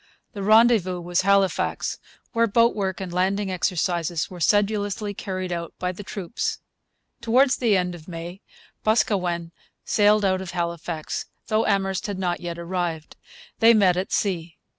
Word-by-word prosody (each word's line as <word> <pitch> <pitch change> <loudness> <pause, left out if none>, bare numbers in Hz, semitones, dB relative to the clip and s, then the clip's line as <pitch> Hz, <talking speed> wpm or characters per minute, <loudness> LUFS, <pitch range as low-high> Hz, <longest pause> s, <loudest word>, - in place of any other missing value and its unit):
The 200 - -6
rendezvous 215 -3 +4
was 175 +1 0
Halifax, 195 0 +1 0.3
where 230 -1 +3
boat 230 +3 +3
work 190 -2 -2
and 185 -3 -5
landing 190 +2 0
exercises 175 -2 -1
were 180 - -8
sedulously 205 +2 +1
carried 185 -2 -4
out 170 -1 -4
by 180 0 -2
the 185 - -9
troops. 200 +1 -4 0.6
Towards 255 +3 +3
the 225 -5 +3
end 180 -1 -1
of 165 -2 -12
May 175 +2 -7 0.4
Boscawen 180 -6 +1 0.3
sailed 210 0 +3
out 185 -1 +1
of 190 - -6
Halifax, 170 -2 -3 0.2
though 215 +1 +2
Amherst 195 -1 0
had 200 -2 -4
not 180 -2 -1
yet 170 -1 -5
arrived. 170 -2 -3 0.4
They 230 +1 +7
met 190 -4 +4
at 185 +2 -3
sea. 170 -5 -1
185 Hz, 150 wpm, -24 LUFS, 175-205 Hz, 0.6 s, They